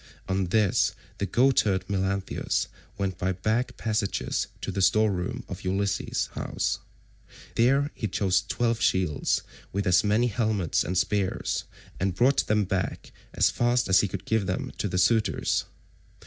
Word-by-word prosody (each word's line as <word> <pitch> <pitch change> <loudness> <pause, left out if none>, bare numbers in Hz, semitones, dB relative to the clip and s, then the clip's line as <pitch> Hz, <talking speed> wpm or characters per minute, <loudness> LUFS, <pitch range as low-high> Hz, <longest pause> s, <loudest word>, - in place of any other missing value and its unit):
On 95 0 0
this 105 +2 +2 0.2
the 100 - -1
goatherd 105 -5 +2
Melanthius 95 -1 -1 0.3
went 95 -3 -2
by 95 +1 0
back 110 +7 -1
passages 110 -3 -1
to - - -3
the 100 - -2
store 110 +3 +4
room 90 -2 -3
of - - -7
Ulysses' 100 +1 -1
house. - - -2 0.7
There 135 +5 +3
he 110 - -3
chose 95 -3 +1
twelve 115 +4 -1
shields, 90 -6 +1 0.3
with 100 +1 -2
as 90 -2 +4
many 105 +3 +3
helmets 110 -7 0
and 90 +4 -2
spears, 100 +1 0 0.3
and 95 -1 0
brought 130 +7 +3
them 105 0 +3
back 95 -1 -3 0.2
as - - +4
fast 120 +1 +1
as 95 - +6
he 100 - +2
could 95 0 -5
to - - -13
give 110 -4 +1
them 90 - -2
to - - 0
the 90 -1 -2
suitors. 110 +2 +2
100 Hz, 155 wpm, -27 LUFS, 95-110 Hz, 0.7 s, as